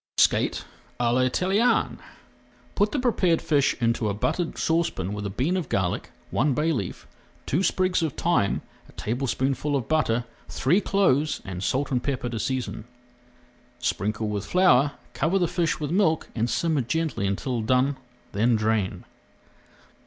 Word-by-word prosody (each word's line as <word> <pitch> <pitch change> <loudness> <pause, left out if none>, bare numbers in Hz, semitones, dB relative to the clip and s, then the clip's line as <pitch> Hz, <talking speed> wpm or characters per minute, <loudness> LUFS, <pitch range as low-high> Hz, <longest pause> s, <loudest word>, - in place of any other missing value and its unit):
SKATE - - +2 0.3
À 120 -1 +2
L'ITALIENNE 180 - +2 0.7
Put 205 +1 +1
the - - -1
prepared 200 -10 +2
fish 145 -4 +2
into 115 -2 +1
a 100 - -2
buttered 165 - -1
saucepan 160 - 0
with 105 -1 -3
a - - -4
bean 130 - 0
of 180 -7 -2
garlic, 95 -2 -1 0.2
one 135 +1 +2
bay 155 +2 +1
leaf, 100 - -4 0.4
two 155 - +1
sprigs 185 -2 +1
of 160 -4 -1
thyme, 165 - +1 0.3
a - - -17
tablespoonful 135 +4 -1
of 130 -4 -2
butter, 125 -7 +1 0.2
three 175 +10 +2
cloves, 155 -8 +2
and 90 -2 -5
salt 135 +5 0
and 125 -2 +1
pepper 130 -3 -2
to 115 -2 -4
season. 130 -3 -3 0.9
Sprinkle 105 -2 -1
with 105 -1 -3
flour, 145 -7 +4 0.2
cover 165 +7 +1
the 175 -3 +2
fish 165 -1 0
with 150 -1 -3
milk, 175 -4 +2
and 115 +1 -1
simmer 155 +3 +1
gently 145 -4 -1
until 115 +5 -2
done, 130 +5 +2 0.4
then 115 +4 +2
drain. 110 -3 0
135 Hz, 150 wpm, -25 LUFS, 115-165 Hz, 0.9 s, flour